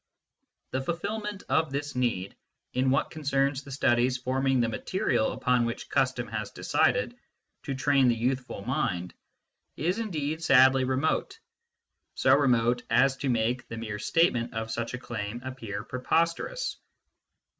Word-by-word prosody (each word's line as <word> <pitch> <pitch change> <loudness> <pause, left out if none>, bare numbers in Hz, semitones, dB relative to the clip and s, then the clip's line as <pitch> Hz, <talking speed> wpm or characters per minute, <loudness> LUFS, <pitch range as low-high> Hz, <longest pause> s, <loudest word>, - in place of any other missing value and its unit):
The 130 - -1
fulfilment 205 +6 -4
of 160 -3 +1
this 145 +1 -3
need, 115 -7 -1 0.4
in 130 +1 +2
what 135 +2 +1
concerns 140 -2 0
the 140 - -13
studies 125 -1 +2
forming 130 +1 +1
the 120 - +2
material 150 - 0
upon 125 -1 +1
which 115 0 -4
custom - - +1
has - - -4
decided - - +1 0.5
to 135 - -2
train 135 -1 +3
the 120 - +3
youthful 125 -3 -2
mind, 90 - -1 0.6
is 180 +7 0
indeed 160 -7 -2
sadly 130 -3 +5
remote 130 +4 0 0.8
so - - +4
remote 120 -3 +2
as 130 +4 +4
to 135 - -2
make 120 +2 0
the 115 - -7
mere 105 -2 -5
statement 120 -4 +1
of 110 0 -3
such 115 +2 -3
a - - -5
claim 115 -2 -5
appear 115 -6 -5
preposterous. 170 - -1
130 Hz, 140 wpm, -28 LUFS, 120-145 Hz, 0.8 s, sadly